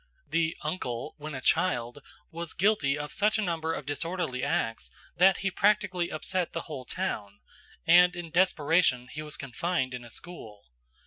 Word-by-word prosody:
The 165 Hz, -1 st, 0 dB
"uncle" 150 Hz, -5 st, -3 dB
when 150 Hz, -1 st, -6 dB
a 130 Hz, -, -5 dB
child 125 Hz, -7 st, +1 dB, 0.3 s
was 170 Hz, 0 st, -5 dB
guilty 175 Hz, -8 st, +2 dB
of 150 Hz, 0 st, -5 dB
such 210 Hz, +2 st, +2 dB
a -, -, 0 dB
number 165 Hz, -3 st, -1 dB
of 150 Hz, -, -4 dB
disorderly 145 Hz, -2 st, -2 dB
acts 140 Hz, -7 st, -1 dB, 0.3 s
that 190 Hz, +2 st, +5 dB
he 195 Hz, -, +2 dB
practically 190 Hz, -3 st, +2 dB
upset 180 Hz, +3 st, -2 dB
the 165 Hz, -, -2 dB
whole 135 Hz, -5 st, -7 dB
town, 105 Hz, -, -3 dB, 0.5 s
and 180 Hz, +2 st, +7 dB
in 175 Hz, -2 st, -6 dB
desperation 160 Hz, -7 st, +3 dB
he 150 Hz, -, -5 dB
was 150 Hz, -1 st, -6 dB
confined 135 Hz, 0 st, -2 dB
in 125 Hz, -1 st, -6 dB
a 120 Hz, -, -11 dB
school. 115 Hz, -9 st, -9 dB
160 Hz, 165 wpm, -29 LUFS, 130-180 Hz, 0.5 s, and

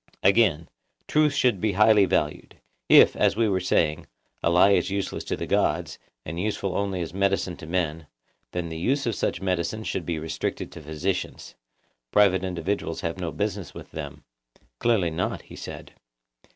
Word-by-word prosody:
Again, 95 Hz, -6 st, +3 dB, 0.4 s
truth 150 Hz, -1 st, +3 dB
should 125 Hz, -9 st, +2 dB
be 110 Hz, -2 st, +1 dB
highly 105 Hz, +1 st, +5 dB
valued; 75 Hz, -5 st, -2 dB, 0.3 s
if, -, -, +7 dB
as -, -, +2 dB
we 115 Hz, 0 st, +2 dB
were 95 Hz, -2 st, +1 dB
saying, 80 Hz, -4 st, +1 dB, 0.3 s
a -, -, +2 dB
lie 90 Hz, +4 st, +5 dB
is 100 Hz, -, +2 dB
useless 100 Hz, 0 st, -3 dB
to -, -, -2 dB
the -, -, -4 dB
gods, -, -, 0 dB, 0.3 s
and 80 Hz, +3 st, -5 dB
useful 100 Hz, -1 st, -2 dB
only 100 Hz, -2 st, -1 dB
as 80 Hz, -, -6 dB
a -, -, -7 dB
medicine 100 Hz, -2 st, +1 dB
to 80 Hz, -, -10 dB
men, 80 Hz, -3 st, -2 dB, 0.4 s
then 90 Hz, -1 st, -3 dB
the 80 Hz, 0 st, -6 dB
use 135 Hz, -, 0 dB
of 115 Hz, -, 0 dB
such -, -, -2 dB
medicines 95 Hz, +4 st, -1 dB
should 90 Hz, -5 st, -3 dB
be 85 Hz, -2 st, -1 dB
restricted 80 Hz, +1 st, -4 dB
to -, -, -10 dB
physicians; 80 Hz, +5 st, -4 dB, 0.6 s
private 95 Hz, -3 st, +4 dB
individuals 90 Hz, -1 st, -3 dB
have 85 Hz, +2 st, -3 dB
no 85 Hz, -3 st, -3 dB
business 100 Hz, +4 st, -3 dB
with -, -, -10 dB
them. 75 Hz, -3 st, -7 dB, 0.6 s
Clearly 105 Hz, -8 st, +2 dB
not, 85 Hz, +3 st, -2 dB
he -, -, -13 dB
said. -, -, -9 dB
95 Hz, 175 wpm, -25 LUFS, 85-100 Hz, 0.6 s, if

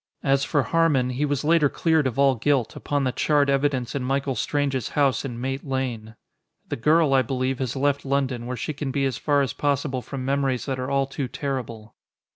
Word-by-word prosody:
As 135 Hz, 0 st, +2 dB
for 145 Hz, -2 st, +1 dB
Harmon, 150 Hz, -7 st, +2 dB
he 135 Hz, +4 st, 0 dB
was 145 Hz, -1 st, -1 dB
later 155 Hz, -1 st, +4 dB
cleared 160 Hz, -3 st, +2 dB
of 130 Hz, -, -4 dB
all 140 Hz, -1 st, +5 dB
guilt, 125 Hz, -1 st, 0 dB
upon 145 Hz, -1 st, -1 dB
the 130 Hz, -, +1 dB
charred 145 Hz, +1 st, +2 dB
evidence 135 Hz, -3 st, 0 dB
in 140 Hz, -, -2 dB
Michael 135 Hz, +1 st, 0 dB
Strange's 135 Hz, -3 st, -1 dB
house 140 Hz, -3 st, +2 dB
in 120 Hz, -4 st, -5 dB
Mate 135 Hz, +2 st, -3 dB
Lane. 125 Hz, -5 st, -3 dB, 0.5 s
The -, -, -1 dB
girl, 150 Hz, +3 st, +3 dB
I 135 Hz, -, +5 dB
believe, 130 Hz, +1 st, -2 dB
has 130 Hz, -1 st, -2 dB
left 140 Hz, +1 st, +1 dB
London, 135 Hz, -3 st, -1 dB
where 125 Hz, 0 st, -4 dB
she 150 Hz, -, -3 dB
can 145 Hz, -1 st, -4 dB
be 135 Hz, +1 st, 0 dB
as 130 Hz, -3 st, -2 dB
far 145 Hz, -2 st, +2 dB
as 130 Hz, -, -3 dB
possible 140 Hz, -2 st, -1 dB
from 130 Hz, 0 st, -6 dB
memories 135 Hz, -2 st, 0 dB
that 135 Hz, -2 st, -3 dB
are 130 Hz, +1 st, -3 dB
all 140 Hz, 0 st, +2 dB
too 135 Hz, 0 st, -4 dB
terrible. 120 Hz, -6 st, -5 dB
135 Hz, 210 wpm, -24 LUFS, 130-145 Hz, 0.5 s, all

